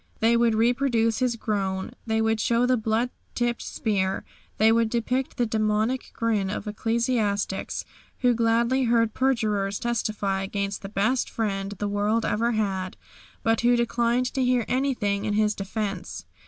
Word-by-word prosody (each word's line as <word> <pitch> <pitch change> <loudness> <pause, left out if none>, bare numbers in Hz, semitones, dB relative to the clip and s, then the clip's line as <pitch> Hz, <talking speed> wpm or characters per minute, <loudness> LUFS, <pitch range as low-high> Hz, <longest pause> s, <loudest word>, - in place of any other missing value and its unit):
They 230 +1 +4
would 235 -1 +3
reproduce 230 -1 +2
His 250 -2 +1
groan. 195 -4 -2 0.2
They 220 0 +1
would 220 0 +1
show 235 +2 +2
the 255 0 +3
blood 225 +2 0 0.2
tipped 240 -1 0
spear. 195 -4 -1 0.3
They 220 +1 +5
would 230 0 +3
depict 250 +3 -1
the 240 - +2
demoniac 215 +3 0
grin 215 -4 0
of 205 - -4
ecclesiastics 215 -2 -1 0.4
who 250 -1 +4
gladly 235 +3 +2
heard 230 -2 +2
perjurers 210 -7 0
testify 210 -4 -1
against 200 0 -3
the 195 - -7
best 220 +6 +1
Friend 195 -3 -2
the 205 - -2
world 205 +3 0
ever 235 +3 +1
had, 190 -4 -2 0.5
but 225 0 +2
who 240 +1 +4
declined 240 +1 +1
to 265 - 0
hear 250 -2 +2
anything 245 -7 0
in 210 - 0
His 210 0 +2
defence. 195 -1 -4
225 Hz, 155 wpm, -25 LUFS, 205-235 Hz, 0.5 s, They